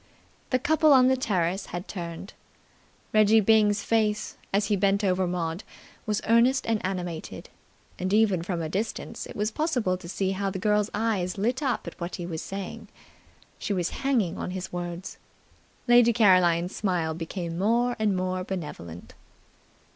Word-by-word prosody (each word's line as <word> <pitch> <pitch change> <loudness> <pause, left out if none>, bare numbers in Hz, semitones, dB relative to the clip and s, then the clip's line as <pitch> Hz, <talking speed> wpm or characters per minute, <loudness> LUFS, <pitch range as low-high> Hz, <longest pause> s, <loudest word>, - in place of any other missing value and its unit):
The 255 - +3
couple 310 +4 +3
on 255 -1 +6
the 260 - +4
terrace 190 -6 -1
had 175 +1 -6
turned. 170 0 -7 0.8
Reggie 215 +1 +6
Byng's 210 -1 +3
face, 215 -2 0 0.2
as 200 +1 +2
he 205 - +1
bent 200 +1 +2
over 185 -1 +1
Maud, 175 +1 -3 0.4
was 210 -1 -1
earnest 240 +4 +4
and 225 -2 0
animated, 180 -3 -5 0.5
and 185 +1 -2
even 205 -4 +3
from 170 -1 -3
a - - -2
distance 200 +7 -4
it - - -10
was 210 +2 -1
possible 245 - 0
to 175 -2 -11
see 190 +1 -1
how 195 +1 -1
the 190 - -4
girl's 210 +2 +1
eyes 205 -5 -1
lit 240 +7 0
up 265 -4 -1
at - - -9
what 170 +1 -4
he 175 - -5
was 165 -2 -4
saying. 195 -1 -6 0.7
She 205 - -2
was 180 -3 -1
hanging 230 -11 +1
on - - -3
his 185 0 -6
words. 175 0 -5 0.7
Lady 240 -1 +6
Caroline's 185 -5 +4
smile 175 -5 -1
became 170 +1 -5
more 240 +4 +2
and 210 -3 +1
more 185 0 -2
benevolent. 150 - -7
195 Hz, 160 wpm, -26 LUFS, 180-220 Hz, 0.8 s, on